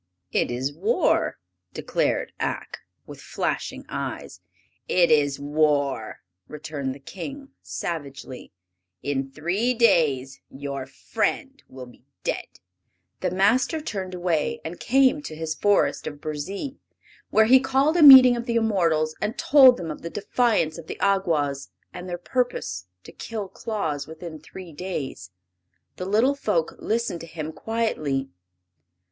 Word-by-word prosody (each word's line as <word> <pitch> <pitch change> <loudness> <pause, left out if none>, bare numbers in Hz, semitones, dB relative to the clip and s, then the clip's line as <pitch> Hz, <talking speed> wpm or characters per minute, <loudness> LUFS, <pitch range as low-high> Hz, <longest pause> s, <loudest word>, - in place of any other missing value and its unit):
"It - - +1
is 130 +4 -2
war!" 460 - +1 0.4
declared - - -1
Ak, - - -3 0.3
with - - -11
flashing - - -3
eyes. - - -6 0.5
"It 175 -2 +3
is 145 -2 +3
war!" 145 -5 0 0.3
returned 145 -3 -5
the - - -13
King, 275 - -8
savagely. 140 -6 -6 0.5
"In 135 -1 -2
three 185 - -1
days 140 - +2
your 140 -1 -6
friend 250 - -3
will 130 -1 -9
be 120 0 -18 0.2
dead." - - -2 0.7
The 185 - 0
Master 210 - +2
turned 190 -10 -5
away 175 -4 -1
and 165 +2 -6
came 270 +3 +3
to 155 - -7
his 160 0 -3
Forest 205 +5 +1
of 145 -1 -6
Burzee, 190 - -5 0.5
where 220 - +5
he 260 +4 +7
called 270 +4 +2
a 345 - +3
meeting 260 -4 +11
of 235 +1 -5
the 235 - -1
immortals 170 -9 +1
and 210 +6 -2
told 285 -6 +7
them 165 -3 -5
of 150 - -8
the 170 - -5
defiance 205 -5 0
of 160 - -11
the - - -6
Awgwas 160 -9 0 0.2
and 180 +1 -7
their 175 - -3
purpose 175 - -2 0.2
to - - -12
kill 215 -4 -6
Claus 160 - -4
within 160 0 -9
three 170 +2 -11
days. 145 - -5 0.7
The 180 - -4
little 220 +8 +3
folk 210 - -1
listened 220 -6 -2
to 165 - -9
him 155 -1 -6
quietly. 155 - -2
175 Hz, 140 wpm, -24 LUFS, 145-230 Hz, 0.7 s, meeting